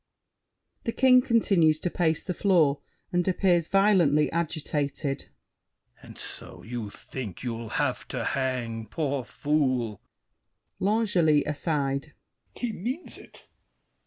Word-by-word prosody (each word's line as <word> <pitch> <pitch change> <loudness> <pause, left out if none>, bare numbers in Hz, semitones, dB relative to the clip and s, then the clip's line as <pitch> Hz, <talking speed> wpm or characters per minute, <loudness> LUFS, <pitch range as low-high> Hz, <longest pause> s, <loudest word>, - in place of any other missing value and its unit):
[The 230 - 0
King 255 -1 +6
continues 195 - +3
to 180 - -1
pace 160 -3 +1
the 180 - -3
floor 165 -8 +3 0.3
and 175 0 +1
appears 180 -3 +2
violently 185 -7 +4
agitated. 145 -3 -2
THE - - -8
KING. - - -30 0.7
And - - -13
so, - - -10
you 115 -2 -5
think 110 -2 -8
you'll 115 -2 -4
have - - -1
to - - -3
hang, 120 -4 -2
poor 140 -5 -2
fool! 130 -4 0 0.8
L'ANGELY 190 -8 +3
(aside). 145 -2 -1 0.4
He 240 -3 -3
means 255 - -4
it! - - -15
155 Hz, 120 wpm, -27 LUFS, 135-185 Hz, 0.8 s, King